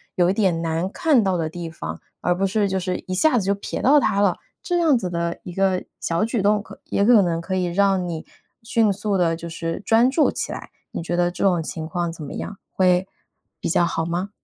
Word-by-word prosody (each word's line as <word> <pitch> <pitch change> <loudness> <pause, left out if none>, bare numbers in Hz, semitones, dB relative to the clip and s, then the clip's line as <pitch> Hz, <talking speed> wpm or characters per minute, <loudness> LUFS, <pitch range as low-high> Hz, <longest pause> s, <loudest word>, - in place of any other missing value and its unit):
有 175 -1 +3
一 - - +2
点 190 -6 +1
难 165 +3 -1
看 300 -7 +3
到 190 -2 +1
的 160 - -1
地 170 0 -6
方， 80 - -7 0.2
而 175 - +1
不 195 +2 0
是 205 +1 +1
就 190 -1 -1
是 180 0 -2
一 185 - -3
下 250 +7 +3
子 200 - 0
就 200 - +2
暼 200 - -5
到 285 +4 +6
它 210 -6 +1
了。 200 -3 +2 0.3
这 350 -1 0
样 315 -6 +4
子 185 -6 -3
的 170 0 -2
一 180 - -8
个 190 0 +1 0.2
小 165 +2 0
举 230 -1 -1
动 205 +1 +3
可 - - -13
也 200 - +1
可 230 -2 +7
能 170 -3 0
可 185 +3 -3
以 185 -1 +1
让 190 +1 +2
你 165 -2 -5 0.4
迅 225 -2 +2
速 200 0 -1
地 170 -2 +2
就 170 +1 -8
是 165 +1 -4
专 230 +3 +4
注 300 +3 +3
起 - - -4
来。 - - -8 0.2
你 - - -4
觉 175 +1 -2
得 175 0 +2
这 180 - -4
种 180 -4 +3
情 160 0 -5
况 170 +1 -2
怎 165 -2 -9
么 140 - -7
样？ 200 - -6
会 185 0 +2 0.5
比 - - -2
较 170 +1 +3
好 165 -1 -1
吗？ 175 +4 -2
185 Hz, 260 characters per minute, -22 LUFS, 170-205 Hz, 0.5 s, 可